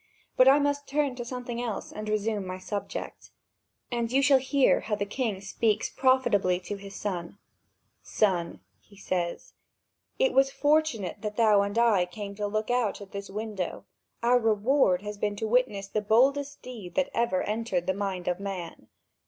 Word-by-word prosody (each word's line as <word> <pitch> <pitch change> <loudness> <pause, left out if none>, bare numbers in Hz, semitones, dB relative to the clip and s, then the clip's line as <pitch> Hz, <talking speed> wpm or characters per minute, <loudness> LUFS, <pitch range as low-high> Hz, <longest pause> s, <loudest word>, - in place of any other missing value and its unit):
But 255 - +6
I 275 +2 +8
must 285 0 0
turn 285 -1 0
to 245 - -5
something 240 -1 -5
else 230 -5 -4
and 215 0 -6
resume 215 -1 0
my 185 0 -4
subject, 200 +2 -6 0.6
and 235 -1 -1
you 270 +2 +3
shall 275 -1 +6
hear 270 +1 +3
how 210 - -2
the 205 - -2
king 210 -2 -2
speaks 210 +2 0
profitably 205 -9 +2
to 195 +3 -5
his 200 0 -10
son: 180 -2 -4 0.6
"Son," 175 - 0 0.2
he 200 - -21
says, 175 -3 -3 0.6
"it - - +2
was 270 0 +4
fortunate 285 - +1
that 210 -1 -4
thou 215 -3 +5
and 200 +2 -2
I 215 -7 +4
came 200 +2 -7
to 205 0 -3
look 215 +3 -2
out 245 -4 0
this 200 0 -6
window; 205 -3 -4 0.4
our 245 +1 +5
reward 220 -3 +2
has 210 -1 -6
been 205 0 -1
to 220 +2 -3
witness 220 -4 +1
the 215 +2 -1
boldest 275 +7 +2
deed 220 -9 -9
that 280 - +1
ever 235 -5 +1
entered 210 -5 -1
the 190 - +1
mind 190 -2 -3
of 180 0 0
man. 195 -4 -6
215 Hz, 170 wpm, -28 LUFS, 200-250 Hz, 0.6 s, I